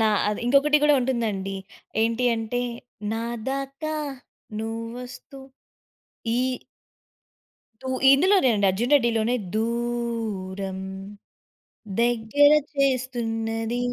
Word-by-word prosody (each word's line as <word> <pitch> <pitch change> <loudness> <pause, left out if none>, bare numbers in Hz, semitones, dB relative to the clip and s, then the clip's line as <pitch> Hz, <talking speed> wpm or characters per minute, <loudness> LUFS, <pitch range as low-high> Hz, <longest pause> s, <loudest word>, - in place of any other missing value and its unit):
నా 220 - +4 0.2
అది 210 - -2
ఇంకొకటి 285 +3 +5
కూడా 295 0 +6
ఉంటుందండి. 215 -6 -1 0.5
ఏంటి 230 +2 +1
అంటే 225 +2 -2 0.5
నాదాకా 270 +7 -3 0.6
నువ్వొస్తూ 230 +4 -7 1.0
ఈ - - +2 1.4
దూ - - -7 0.2
ఇందులోనే 365 +2 +5
అండి 200 -1 +2
'అర్జున్ 230 +9 0
రెడ్డి' 240 -5 +4
లోనే, 225 +2 +1 0.2
దూరం 225 -5 -2 1.2
దెగ్గర 240 +5 +4 0.2
చేస్తున్నది. 235 -4 0
235 Hz, 80 wpm, -25 LUFS, 225-265 Hz, 1.4 s, కూడా